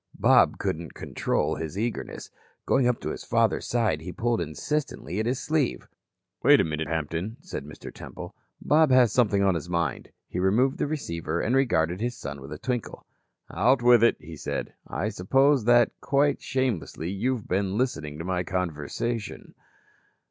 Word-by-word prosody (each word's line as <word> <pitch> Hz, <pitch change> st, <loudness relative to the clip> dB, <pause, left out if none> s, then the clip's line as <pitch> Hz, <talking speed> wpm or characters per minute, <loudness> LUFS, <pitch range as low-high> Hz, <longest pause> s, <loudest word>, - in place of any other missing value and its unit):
Bob -, -, +5 dB
couldn't 80 Hz, 0 st, -3 dB
control -, -, -1 dB
his 80 Hz, +3 st, -5 dB
eagerness. 115 Hz, +2 st, -4 dB, 0.3 s
Going 130 Hz, -2 st, +3 dB
up 125 Hz, -1 st, +1 dB
to -, -, -3 dB
his -, -, -6 dB
father's -, -, +1 dB
side, 110 Hz, -10 st, +1 dB
he 90 Hz, +3 st, -6 dB
pulled 120 Hz, +4 st, 0 dB
insistently 105 Hz, -, -3 dB
at 110 Hz, -, 0 dB
his 125 Hz, +1 st, 0 dB
sleeve. 150 Hz, -4 st, -1 dB, 0.5 s
"Wait -, -, +6 dB
a -, -, +4 dB
minute, 80 Hz, 0 st, -3 dB
Hampton," 80 Hz, -, -3 dB
said 170 Hz, -, -6 dB
Mr. 75 Hz, -, -10 dB
Temple. -, -, -9 dB, 0.3 s
"Bob 155 Hz, 0 st, +4 dB
has 130 Hz, -3 st, +5 dB
something 105 Hz, -5 st, +3 dB
on 95 Hz, -1 st, +4 dB
his 85 Hz, 0 st, -4 dB
mind." 85 Hz, -6 st, -2 dB, 0.2 s
He 90 Hz, -, -4 dB
removed 115 Hz, +9 st, +2 dB
the -, -, 0 dB
receiver 85 Hz, -, -3 dB
and 120 Hz, +8 st, +1 dB
regarded 90 Hz, -9 st, +1 dB
his 120 Hz, 0 st, -2 dB
son 70 Hz, -, -7 dB
with 70 Hz, -, -10 dB
a 75 Hz, -, -5 dB
twinkle. 125 Hz, -, -4 dB, 0.5 s
"Out 120 Hz, +7 st, +3 dB
with 120 Hz, -1 st, +6 dB
it," 115 Hz, -, +4 dB
he 80 Hz, +1 st, -10 dB
said. -, -, -4 dB
"I 105 Hz, -, -2 dB
suppose 135 Hz, +6 st, +2 dB
that 120 Hz, -1 st, +5 dB
quite 140 Hz, +1 st, +2 dB
shamelessly 95 Hz, -, -2 dB
you've 115 Hz, +4 st, -2 dB
been 95 Hz, +1 st, 0 dB
listening 80 Hz, -, -2 dB
to 80 Hz, -, -6 dB
my 90 Hz, -1 st, 0 dB
conversation." 90 Hz, +6 st, -3 dB
105 Hz, 170 wpm, -26 LUFS, 85-125 Hz, 0.5 s, Wait